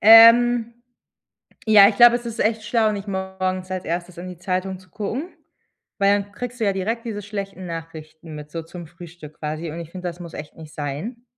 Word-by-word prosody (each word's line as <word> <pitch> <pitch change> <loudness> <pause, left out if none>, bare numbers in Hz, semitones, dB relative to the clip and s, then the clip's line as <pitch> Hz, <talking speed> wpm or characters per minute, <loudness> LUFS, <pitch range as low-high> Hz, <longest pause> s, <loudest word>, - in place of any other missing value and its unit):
Ähm, 230 +1 +8 0.9
ja, 205 -2 +8
ich 210 - -2
glaube, 240 +1 +8
es 240 0 -8
ist 230 -1 -6
echt 220 0 +1
schlau, 220 0 +2
nicht 205 0 -6
morgens 190 -1 -3
als 185 -1 -3
erstes 175 +2 -4
in 180 +1 -6
die 180 -2 -9
Zeitung 185 +1 -2
zu 185 -1 -21
gucken, 250 - -4 0.6
weil 200 0 +3
dann 200 0 -17
kriegst 245 +3 -6
du - - +2
ja 200 - +2
direkt 220 +5 -2
diese 210 -3 -4
schlechten 195 -2 -6
Nachrichten 160 -1 -8
mit 150 0 -9
so 165 +1 -5
zum 170 +1 -10
Frühstück 170 -2 -12
quasi, 155 +2 -4
und 165 +3 -6
ich 165 -1 -8
finde, 180 0 -5
das 175 +1 -8
muss 170 -1 -9
echt 150 0 -8
nicht 155 -2 -12
sein. 155 - -5
190 Hz, 205 wpm, -22 LUFS, 170-220 Hz, 0.9 s, Ähm